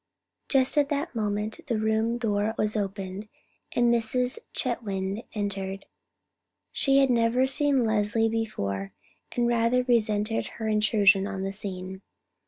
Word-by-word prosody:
Just 270 Hz, +1 st, +3 dB
at 285 Hz, -1 st, +2 dB
that 295 Hz, +3 st, -2 dB
moment 210 Hz, -1 st, -2 dB
the 235 Hz, -5 st, 0 dB
room 220 Hz, +2 st, +1 dB
door 215 Hz, -1 st, 0 dB
was 215 Hz, +1 st, 0 dB
opened, 195 Hz, 0 st, -4 dB, 0.4 s
and 240 Hz, -1 st, +3 dB
Mrs. 245 Hz, -, 0 dB
Chetwynd 200 Hz, -4 st, -2 dB
entered. 195 Hz, -2 st, -3 dB, 0.9 s
She 275 Hz, -1 st, +2 dB
had 270 Hz, -2 st, +4 dB
never 235 Hz, +2 st, +3 dB
seen 270 Hz, -1 st, +2 dB
Leslie 220 Hz, +1 st, +2 dB
before, 100 Hz, -, -3 dB, 0.4 s
and 240 Hz, -1 st, +1 dB
rather 235 Hz, +1 st, +2 dB
resented 225 Hz, -3 st, +1 dB
her 220 Hz, -, -3 dB
intrusion 210 Hz, -2 st, +4 dB
on 195 Hz, -2 st, -4 dB
the 195 Hz, 0 st, -3 dB
scene. 190 Hz, -1 st, -6 dB
220 Hz, 130 wpm, -27 LUFS, 200-240 Hz, 0.9 s, had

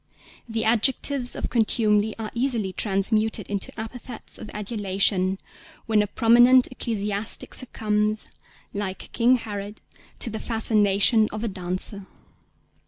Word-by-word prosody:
The 225 Hz, 0 st, -1 dB
adjectives 245 Hz, +3 st, +2 dB
of -, -, -4 dB
contumely 215 Hz, -2 st, +2 dB
are 220 Hz, -1 st, -5 dB
easily 235 Hz, -6 st, -1 dB
transmuted 210 Hz, +1 st, 0 dB
into 200 Hz, -2 st, -3 dB
epithets 240 Hz, +2 st, -6 dB
of -, -, -8 dB
adulation, 195 Hz, -3 st, 0 dB, 0.5 s
when 220 Hz, -1 st, +3 dB
a 205 Hz, -, -1 dB
prominent 240 Hz, +4 st, +5 dB
ecclesiastic 210 Hz, -4 st, -3 dB
succumbs, 215 Hz, -3 st, -1 dB, 0.5 s
like 195 Hz, -2 st, -5 dB
King 245 Hz, +2 st, +4 dB
Herod, 205 Hz, -3 st, -6 dB, 0.4 s
to 230 Hz, -, 0 dB
the 220 Hz, -, -4 dB
fascination 215 Hz, -1 st, +3 dB
of 215 Hz, +1 st, -5 dB
a -, -, 0 dB
dancer. 190 Hz, +1 st, -4 dB
215 Hz, 115 wpm, -24 LUFS, 205-230 Hz, 0.5 s, prominent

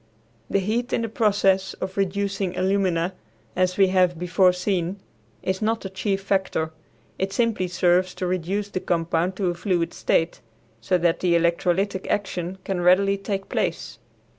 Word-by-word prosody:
The -, -, +2 dB
heat 225 Hz, +6 st, -1 dB
in 230 Hz, -, +1 dB
the 230 Hz, -, -2 dB
process 200 Hz, -3 st, +2 dB
of 190 Hz, -, -5 dB
reducing 195 Hz, -1 st, -1 dB
alumina, 185 Hz, -2 st, +1 dB, 0.4 s
as 185 Hz, 0 st, +1 dB
we 195 Hz, -2 st, +5 dB
have 180 Hz, -2 st, +3 dB
before 180 Hz, +2 st, +3 dB
seen, 180 Hz, 0 st, -2 dB, 0.4 s
is 190 Hz, +2 st, -1 dB
not 225 Hz, +1 st, 0 dB
the 195 Hz, -, -6 dB
chief 195 Hz, 0 st, -1 dB
factor; 190 Hz, -5 st, 0 dB, 0.5 s
it 190 Hz, +1 st, -1 dB
simply 225 Hz, -4 st, +1 dB
serves 180 Hz, 0 st, +2 dB
to 185 Hz, -, -3 dB
reduce 185 Hz, +3 st, -1 dB
the 185 Hz, -, -2 dB
compound 170 Hz, +1 st, 0 dB
to 185 Hz, -2 st, 0 dB
a -, -, -3 dB
fluid 175 Hz, -1 st, -1 dB
state 165 Hz, +1 st, 0 dB, 0.4 s
so 180 Hz, +11 st, +2 dB
that 170 Hz, -1 st, +1 dB
the 175 Hz, -2 st, +2 dB
electrolytic 175 Hz, +3 st, +1 dB
action 190 Hz, -2 st, -2 dB
can 190 Hz, -2 st, -2 dB
readily 195 Hz, +3 st, +4 dB
take 195 Hz, 0 st, -4 dB
place. -, -, -2 dB
185 Hz, 160 wpm, -24 LUFS, 180-195 Hz, 0.5 s, we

